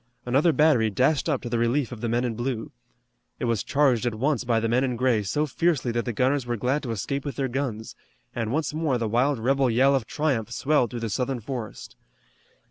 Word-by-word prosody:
Another 140 +7 +3
battery 150 -8 +3
dashed 135 +8 +1
up 140 -4 -1
to - - -4
the 120 -1 0
relief 120 +3 +1
of 115 -3 -8
the 120 - -1
men 120 +2 +1
in 120 - -1
blue. 120 0 -3 0.7
It - - -3
was 115 -3 0
charged 135 -5 +2
at 115 - -2
once 135 +2 0
by 120 -2 +1
the 115 - -1
men 120 +3 +2
in 125 -2 -1
gray 120 -2 +2
so 145 +10 0
fiercely 150 -4 0
that 120 0 -2
the 120 - -1
gunners 130 +3 0
were 120 -1 -1
glad 130 +7 0
to 130 - -6
escape 135 +6 -3
with 140 - -5
their 135 -1 -1
guns, 120 -4 -4 0.4
and 115 -2 -2
once 150 +1 -1
more 155 -5 0
the 115 -2 -1
wild 125 +6 +2
rebel 135 +3 +2
yell 130 +4 +4
of 130 -6 0
triumph 135 -8 -1
swelled 130 0 +1
through 120 +1 -6
the 115 - -2
southern 125 +3 -1
forest. 115 - -7
125 Hz, 225 wpm, -25 LUFS, 115-140 Hz, 0.7 s, yell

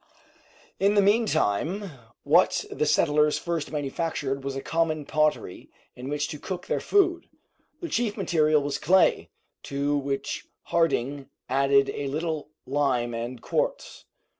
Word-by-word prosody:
In 200 +2 +3
the 205 - +6
meantime 195 - +1 0.3
what 170 +6 +3
the 150 - -1
settlers 150 0 +3
first 170 -3 -3
manufactured 140 -2 -2
was 135 0 -4
a 135 - -3
common 160 -2 0
pottery 155 -12 -1 0.3
in 125 +2 -7
which 145 0 -1
to 150 - -6
cook 185 +2 -5
their - - -1
food. 355 -4 +2 0.5
The 340 - -3
chief 225 -7 -1
material 155 -6 +2
was 140 -1 -2
clay, 185 +4 +3 0.3
to 140 +1 -1
which 140 -1 -3 0.2
Harding 145 -4 0 0.2
added 140 +1 +3
a 145 - -4
little 155 +1 -3 0.2
lime 130 -4 0
and 120 +1 -5
quartz. - - -2
150 Hz, 135 wpm, -26 LUFS, 140-175 Hz, 0.5 s, the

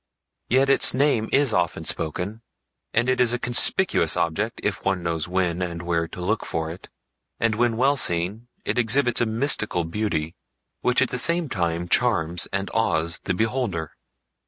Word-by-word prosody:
Yet 130 +3 +3
its 135 - +4
name 130 -5 +1
is 135 -4 +2
often 90 -3 -1
spoken, 90 +8 -2 0.5
and 120 +2 +1
it 130 0 +1
is 120 -1 +3
a - - 0
conspicuous 120 - +3
object 100 +8 -1
if 105 0 -2
one 95 -2 -1
knows 85 -1 -2
when 90 -1 -1
and 85 -1 -4
where 85 -1 -1
to 90 - -10
look 110 +3 0
for 80 -1 -3
it, 85 - -11 0.5
and 115 -1 +1
when 115 0 0
well 135 +4 +3
seen 95 +3 0 0.2
it - - 0
exhibits 120 +1 +2
a 120 - +2
mystical 110 -6 +1
beauty 85 -3 -3 0.5
which 125 +1 +2
at 130 - -2
the 125 - -2
same 170 +1 +2
time 85 -4 -2
charms 90 -8 +1
and 100 0 -3
awes 85 -7 0
the 90 - -1
beholder. 110 - -2
105 Hz, 170 wpm, -23 LUFS, 85-120 Hz, 0.5 s, its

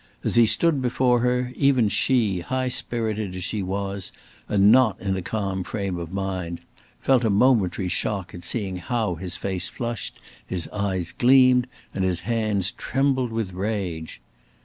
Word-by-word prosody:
As - - 0
he 120 -1 +6
stood 160 +2 +2
before 125 0 +2
her, 125 +1 0
even 135 -5 +3
she, 105 -4 +2
high 130 +8 -2
spirited 110 -6 -2
as 90 - -5
she 105 +4 -2
was, 100 0 -3 0.4
and 100 0 +5
not 125 -3 +4
in 95 0 -1
a 95 - -2
calm 95 -1 -2
frame 100 -1 -3
of 85 0 -6
mind, 95 -3 -3 0.4
felt 130 -2 +3
a 110 - +2
momentary 100 -4 +3
shock 95 +1 -2
at 85 - -9
seeing 95 0 -2
how 105 +3 -1
his 90 +1 -5
face 95 -2 -2
flushed, 120 -6 -5 0.2
his 90 -3 -3
eyes 95 -4 -2
gleamed, 125 0 +5 0.3
and 95 - -1
his 90 -2 0
hands 105 -2 0
trembled 130 -2 0
with 110 -5 -3
rage. 95 -5 -3
100 Hz, 160 wpm, -24 LUFS, 95-120 Hz, 0.4 s, he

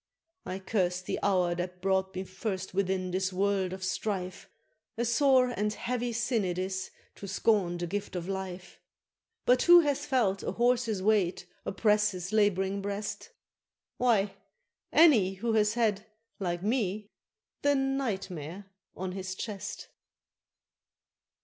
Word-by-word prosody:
I 185 - -3
cursed 185 -2 -1
the - - -2
hour 180 -3 +2
that 180 +1 -4
brought 190 0 0
me 185 - -2
first 190 0 -4
within 190 -1 0
this 185 +1 0
world 190 0 0
of 190 0 -6
strife 185 -1 -3 0.5
A 235 - 0
sore 255 +1 +4
and 210 +1 0
heavy 245 +2 -2
sin 235 -1 0
it 180 -1 -2
is 185 0 -3 0.3
to 200 - -8
scorn 195 -3 +1
the 175 - -3
gift 200 +3 -4
of 175 -1 -4
life 190 -2 -6 0.7
But 250 +1 +4
who 350 0 +8
hath 290 -3 0
felt 205 -7 +1
a - - -3
horse's 235 -4 +1
weight 200 -4 +2 0.2
oppress 210 +1 +3
his 180 +2 -6
laboring 200 -2 +2
breast? 205 +1 -4 0.7
Why, 215 -5 +2 0.6
any 225 - +5
who 225 +4 -1
has 210 0 +3
had, 215 -3 +1 0.3
like 175 -2 -2
me, 210 -2 -1 0.5
the 285 0 +3
NIGHT 270 -8 -1
MARE 170 +4 -7 0.3
on 185 0 -4
his 190 0 -5
chest. 205 -1 -6
195 Hz, 140 wpm, -29 LUFS, 185-225 Hz, 0.7 s, who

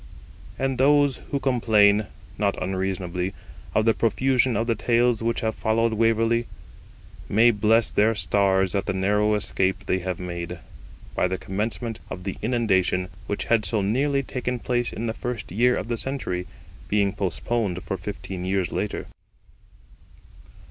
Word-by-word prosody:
] - - -22
And 135 -2 -1
those 145 0 +4
who 140 - -1
complain, 110 -6 +3 0.3
not 100 -1 0
unreasonably, 95 -1 -2 0.4
of 110 - +3
the 115 - +5
profusion 130 +2 +2
of 115 - +1
the 115 - +2
Tales 120 +1 +2
which 115 +1 0
have 110 -1 0
followed 110 +1 +1
Waverley, 115 +1 +2 0.8
may 115 +4 +5
bless 110 +1 +3
their 110 +2 +3
stars 95 0 +2
at 100 - -1
the - - 0
narrow 105 +3 +2
escape 95 -1 -1
they 95 - +1
have 90 0 -4
made, 85 -1 -5 0.6
by - - +1
the 95 +1 -2
commencement 110 +4 -3
of 90 - -6
the 95 0 -4
inundation, 95 -6 +1 0.2
which 100 - -2
had 115 -2 +2
so 105 +2 0
nearly 135 +7 +1
taken 125 -1 -3
place 120 0 -1
in 115 - -4
the 110 - -1
first 115 -5 -5
year 120 +6 +3
of - - -4
the 120 -1 -2
century, 110 -10 -3 0.4
being 100 -2 +2
postponed 100 0 -2
for 95 - -3
fifteen 95 -1 -6
years 95 -3 0
later. - - -3
105 Hz, 155 wpm, -24 LUFS, 95-115 Hz, 0.8 s, the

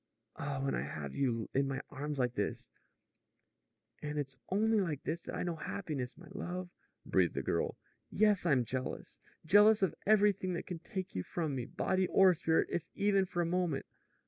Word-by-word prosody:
Ah, 140 -1 -3
when 135 - 0
I - - 0
have 70 0 -5
you 115 -5 0
in 135 +1 +2
my 135 -1 -2
arms 145 +1 -4
like 125 -2 +1
this - - -3 0.6
" - - -45
"And 150 0 -4
it's 140 -2 -3
only 215 +2 +3
like 155 -7 -2
this 170 - -2
that - - -6
I - - -2
know 175 -2 -2
happiness, 150 -10 -4
my 175 - -13
love," 180 -2 -5 0.3
breathed - - +2
the - - -1
girl. - - -1 0.3
"Yes; 210 -3 +3
I'm 140 -8 +3
jealous! 130 +2 -4 0.3
Jealous 205 +4 +6
of 190 - +2
everything 205 -3 +4
that 170 - -3
can 175 -2 -5
take 185 +2 -5
you 90 - -1
from 155 - -2
me, 125 -2 -3
body 185 +7 0
or 190 0 +6
spirit, 160 -1 +1
if 170 -1 -2
even 200 -2 +3
for 175 -1 0
a - - -1
moment. 170 -4 0
165 Hz, 190 wpm, -33 LUFS, 135-190 Hz, 0.6 s, Jealous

